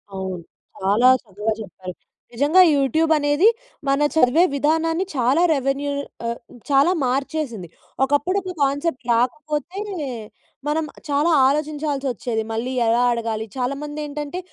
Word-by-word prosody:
అవును. 190 -2 -5 0.4
చాలా 210 +7 +4
చక్కగా 210 +1 -3
చెప్పారు. 185 -2 -8 0.4
నిజంగా 290 +9 +4
యూట్యూబ్ 310 +4 +1
అనేది 290 +6 +3 0.4
మన 275 +1 +2 0.2
చదివే 310 +4 +5
విధానాన్ని 325 +5 +1
చాలా 260 +6 +2
రెవెన్యూ 275 +1 -1 0.4
ఆహ్, 235 - -3 0.3
చాలా 280 +5 +4
మార్చేసింది. 260 - -2 0.4
ఒకప్పుడు, 290 +8 +1
ఒక 370 -1 -5
కాన్సెప్ట్ 280 0 -1
రాకపోతే 300 +8 -1 0.9
మనం 310 +1 0 0.2
చాలా 295 +4 +2 0.2
ఆలోచించాల్సి 295 -1 -1
వచ్చేది. 235 -2 -3
మళ్ళీ 230 +3 -2 0.2
ఎలా 235 +2 +3
అడగాలి? 225 -2 -2
చాలామంది 280 +4 -3
ఏంటంటే 295 +4 -5
280 Hz, 115 wpm, -22 LUFS, 240-305 Hz, 0.9 s, చదివే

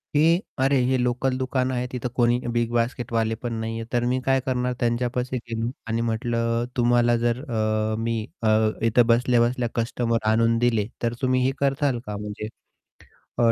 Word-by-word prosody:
की 165 +4 +4 0.2
अरे 135 +1 +3
हे 130 +1 +2
लोकल 125 +1 0
दुकान 130 0 -1
आहे, 125 0 -2
तिथं 125 -1 -3
कोणी 120 -1 +3 0.2
bigbasketवाले 115 -1 0
पण 120 -1 -3
नाही 115 0 -3
आहे, 115 - -5
तर 120 -1 +2
मी 130 - +1
काय 135 0 +3
करणार 125 -1 0
त्यांच्यापाशी 125 +1 -1
गेलो 115 -1 -3 0.2
आणि 115 0 -1
म्हटलं, 115 0 0
"तुम्हाला 120 0 +3
जर 120 +1 +1
अ, 110 -1 0
मी 115 +1 -1 0.3
अ, 115 - +1 0.4
इथं 115 +1 +4
बसल्या-बसल्या 120 0 +2
कस्टमर 115 -1 -1
आणून 115 +1 +3
दिले, 115 -4 +2 0.2
तर 115 0 +1
तुम्ही 130 -1 +2
हे 130 - +2
कराल 140 -2 +1
का 105 - -5
म्हणजे? 105 +1 -6 0.9
अ, 115 -1 +4
120 Hz, 165 wpm, -24 LUFS, 115-125 Hz, 0.9 s, की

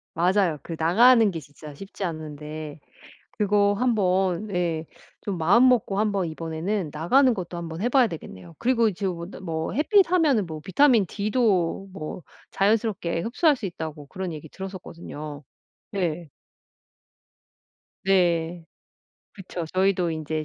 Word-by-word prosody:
맞아요. 180 -1 +2
그 165 - -6
나가는 225 +7 +6
게 165 - -5
진짜 145 0 -12
쉽지 195 +5 -8
않은데 155 -2 -6 0.6
그거 205 -1 +3
한번 195 -4 +1
예 165 -3 -1 0.3
좀 195 -4 -4
마음먹고 215 +4 +4
한번 205 -3 +1
이번에는 165 +3 -3
나가는 250 - +3
것도 180 -5 -5
한번 170 0 -6
해 240 - +1
봐야 250 -2 +4
되겠네요. 95 - -9
그리고 235 -3 +2
지금 185 -1 -3
근데 170 +3 -8
뭐 165 -3 -3
햇빛하면은 325 - +3
뭐 160 -3 -7
비타민 230 - +4
D도 200 -4 0
뭐 155 0 -6 0.3
자연스럽게 200 -5 0
흡수할 275 - +2
수 240 - -9
있다고 160 -5 -6
그런 185 -1 -5
얘기 155 0 -10
들었었거든요. 165 -6 -8 0.5
네. 175 -4 -2 1.8
네. 175 -3 +1 0.7
그쵸. 185 -3 -6
저희도 185 -2 +2
인제 155 -1 -3
185 Hz, 280 characters per minute, -25 LUFS, 160-210 Hz, 1.8 s, 나가는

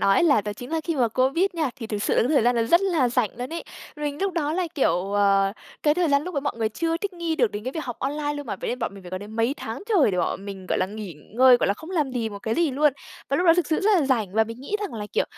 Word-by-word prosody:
nói 195 0 +4
ấy - - +4
là 285 -10 +5
đó 210 0 -4
chính 245 +7 -9
là 325 - 0
khi 330 -3 -1
mà 245 -3 +3
Covid 265 - +2
nha, 315 -6 -1
thì 230 - -6
thực 210 -2 -3
sự - - +1
là - - +4
những 245 - 0
thời 285 -7 +4
gian 245 +1 +4
đó 230 - +2
rất 340 +10 +4
là 340 -10 +2
rảnh 240 -3 +1
luôn 250 +5 -5
ấy. 335 - -5 0.3
Mình 295 0 -3
lúc 390 -2 0
đó 305 -3 -1
là, 360 +2 0
kiểu, 195 - +1
ờ, 195 -1 +3 0.3
cái 295 -1 +4
thời 350 -1 +1
gian 280 0 +3
lúc 360 +1 -6
đó 280 - 0
mọi 285 - -2
người 220 -1 0
chưa 330 +8 -1
thích 400 +2 -4
nghi 335 -2 -2
được 215 - +2
đến 205 +1 -5
cái 255 - -3
việc 315 - -4
học 245 -2 -5
online 290 +2 -2
luôn 290 -2 -6
mà, 200 - -3
vậy - - -5
nên 250 - -3
bọn - - -3
mình 195 - -11
phải 175 - -9
có 185 - -3
đến 210 +2 -9
mấy 230 +5 +1
tháng 225 - -6
trời 345 - +4
để 180 - -2
bọn 190 +2 -1
mình, 195 -2 -8
gọi - - 0
là, 185 - +1
nghỉ 205 -3 -7 0.2
ngơi, 255 0 +7
gọi - - 0
là, 200 - +2
không 320 - -11
làm 305 -7 0
gì 230 -3 -1
một 205 -2 -8
cái 220 +2 -2
gì 335 -4 +2
luôn. 290 +1 +3 0.4
Và 275 - +1
lúc 355 +4 +1
đó 330 - +7
thực 355 - +1
sự 315 - 0
rất 420 +2 +3
là 280 - 0
rảnh 220 -8 0
và 220 - +4
mình 230 +3 -9
nghĩ 405 +10 -2
rằng 410 - -4
là, 210 -2 -5
kiểu, - - +2
260 Hz, 340 wpm, -24 LUFS, 215-320 Hz, 0.4 s, ngơi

